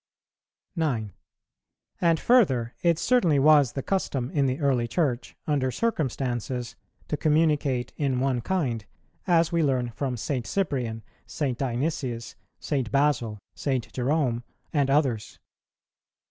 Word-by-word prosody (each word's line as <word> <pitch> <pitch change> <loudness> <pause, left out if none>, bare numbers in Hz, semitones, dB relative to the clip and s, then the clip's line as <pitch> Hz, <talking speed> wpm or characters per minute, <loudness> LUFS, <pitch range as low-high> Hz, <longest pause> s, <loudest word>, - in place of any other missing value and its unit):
9. 120 - -1 0.9
And, 165 -2 +3
further, 135 - +3
it 170 -2 +3
certainly 185 - +3
was 145 -2 +5
the 135 - -3
custom 140 -10 -1
in 140 -3 +2
the 130 +3 -1
early 130 -5 +1
Church, 130 -4 -1
under 140 -4 +1
circumstances, 125 - -2 0.3
to - - -1
communicate 150 -5 +1
in 135 -4 0
one 130 -2 +1
kind, 125 - -1 0.4
as 170 -2 +3
we 170 -1 +2
learn 130 -5 +1
from 130 +1 -3
St. 125 +1 -3
Cyprian, 125 - -2 0.2
St. 140 -5 -2
Dionysius, 125 -2 -2 0.3
St. 135 -6 -2
Basil, 140 -6 +1 0.2
St. 130 -5 -2
Jerome, 130 -2 0 0.3
and 140 -3 +2
others. 135 -7 +1
135 Hz, 120 wpm, -26 LUFS, 120-155 Hz, 0.9 s, was